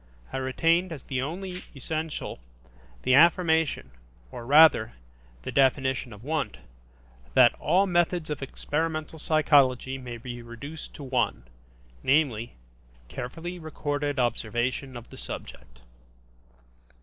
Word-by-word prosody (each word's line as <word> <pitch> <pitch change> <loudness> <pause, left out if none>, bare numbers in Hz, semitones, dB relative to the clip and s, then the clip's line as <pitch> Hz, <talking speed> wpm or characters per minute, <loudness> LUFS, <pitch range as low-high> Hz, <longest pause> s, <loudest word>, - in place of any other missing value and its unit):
I - - -1
retained 165 +7 +1
as 150 -5 -7
the 130 -2 -2
only 180 +5 -5
essential, 155 - -4 0.6
the 130 - +3
affirmation, 160 - +4 0.4
or, 120 - -8
rather, 150 -6 +6 0.5
the - - -4
definition 130 -2 +2
of 105 +1 -12
Wundt, 155 +1 -2 0.8
that 125 -2 +7
"all 180 +6 +3
methods 175 -3 +1
of 150 - -4
experimental 155 +3 -3
psychology 140 -4 +3
may 120 -2 -7
be 120 +1 -7
reduced 140 +7 -9
to 145 - -8
one, 130 - 0 0.6
namely, 130 - +1 0.5
carefully 165 +8 -6
recorded 145 -2 -3
observation 120 +2 -1
of 120 - -11
the - - -11
subject". - - -9
140 Hz, 115 wpm, -27 LUFS, 125-160 Hz, 0.8 s, that